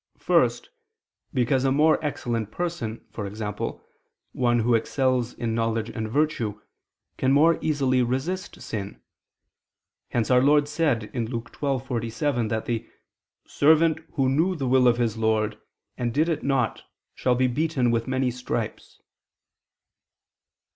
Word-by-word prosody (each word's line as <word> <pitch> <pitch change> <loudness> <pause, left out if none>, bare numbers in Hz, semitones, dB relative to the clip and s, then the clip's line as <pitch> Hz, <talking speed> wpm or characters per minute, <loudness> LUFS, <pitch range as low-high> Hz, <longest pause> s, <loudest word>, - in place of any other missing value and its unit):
First, - - +1 0.6
because 130 +1 +1
a 135 - +2
more 155 +3 +3
excellent 120 -7 -2
person, 145 -9 -4
e.g. 105 0 -5 0.9
one 120 -2 +1
who 120 +2 +2
excels 125 +1 +1
in 115 -1 -2
knowledge 115 -1 -1
and 110 -2 -4
virtue, 130 -5 0 0.6
can 130 - +2
more 155 +4 +5
easily 135 -4 +1
resist 135 +10 -2
sin; 100 -3 -5 1.1
hence 120 0 0
Our 125 0 +6
Lord 145 +2 +4
said 145 -8 0
(Luke 120 -1 -4
12:47) 120 -2 -1
that 110 0 -2
the 115 -2 -3 0.6
"servant 160 +2 +3
who 135 -5 +1
knew 160 +8 +2
the 135 -5 -2
will 125 0 +4
of 120 -1 +4
his 115 -2 0
lord... 110 -1 0 0.4
and 120 -1 0
did 155 +7 +1
it 165 - -1
not... 135 -4 0 0.3
shall 125 -1 +1
be 130 +1 +2
beaten 130 -1 +1
with 115 +1 0
many 130 -1 0
stripes." 125 +1 -5
125 Hz, 130 wpm, -25 LUFS, 115-145 Hz, 1.1 s, Our